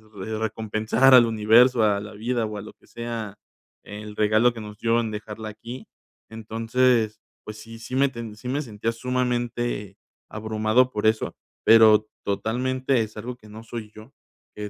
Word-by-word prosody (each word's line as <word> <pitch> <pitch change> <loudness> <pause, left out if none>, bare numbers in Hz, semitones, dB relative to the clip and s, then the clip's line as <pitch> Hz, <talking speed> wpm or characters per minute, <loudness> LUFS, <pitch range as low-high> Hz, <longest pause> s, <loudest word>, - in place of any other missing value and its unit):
re 110 +3 -5
recompensar 110 +4 +2
al 120 -2 +8
universo, 115 +2 +4
a 100 -1 +3
la 105 +1 -9
vida, 115 +2 -1
o 105 -1 -5
a - - -5
lo 110 - -11
que - - -27
sea, 115 -3 -6 0.5
el 105 0 -9
regalo 110 +3 +3
que 115 - -8
nos 105 0 -9
dio 115 0 +2
en 115 - -3
dejarla 105 +1 -6
aquí. 115 +4 -9 0.4
Entonces, 115 0 0 0.3
pues 110 0 -8
sí, 115 +1 -11
sí 125 +3 -6
me 140 0 +3
ten 115 -4 -8
sí 125 - -9
me 145 +3 -1
sentía 115 -2 -3
sumamente 120 -4 -2 0.3
abrumado 110 +3 +1
por 105 -1 0
eso, 110 0 0 0.3
pero 110 -1 +7 0.2
totalmente 130 +5 0
es 110 0 -10
algo 120 +3 -6
que 105 -3 -17
no 110 +1 -10
soy 110 -2 -8
yo, 110 - -10 0.5
eh, 105 0 -6
110 Hz, 170 wpm, -24 LUFS, 105-120 Hz, 0.5 s, al